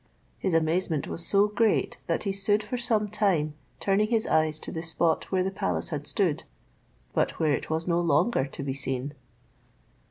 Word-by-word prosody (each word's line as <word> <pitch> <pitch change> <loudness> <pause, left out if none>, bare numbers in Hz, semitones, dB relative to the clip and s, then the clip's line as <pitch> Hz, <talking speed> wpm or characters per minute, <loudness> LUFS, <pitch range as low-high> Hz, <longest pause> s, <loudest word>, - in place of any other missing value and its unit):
His 185 -4 0
amazement 160 -1 +1
was 170 - -2
so 200 +4 +4
great, 210 +1 +1
that - - 0
he 200 - 0
stood 205 +2 +1
for 215 - -4
some 230 -3 +1
time 195 -8 +1 0.3
turning 200 +2 +2
his 225 -1 +1
eyes 155 -1 +2
to - - -6
the 160 - -4
spot 165 0 +1
where 185 -1 +2
the 190 - -1
palace 90 - -2
had - - -4
stood, - - 0 0.7
but - - 0
where 155 -2 +3
it 130 - -3
was 160 +2 -1
no 170 -1 +2
longer 165 - +2
to 140 - -7
be 135 -1 -2
seen. 135 +1 -3
175 Hz, 185 wpm, -27 LUFS, 155-205 Hz, 0.7 s, so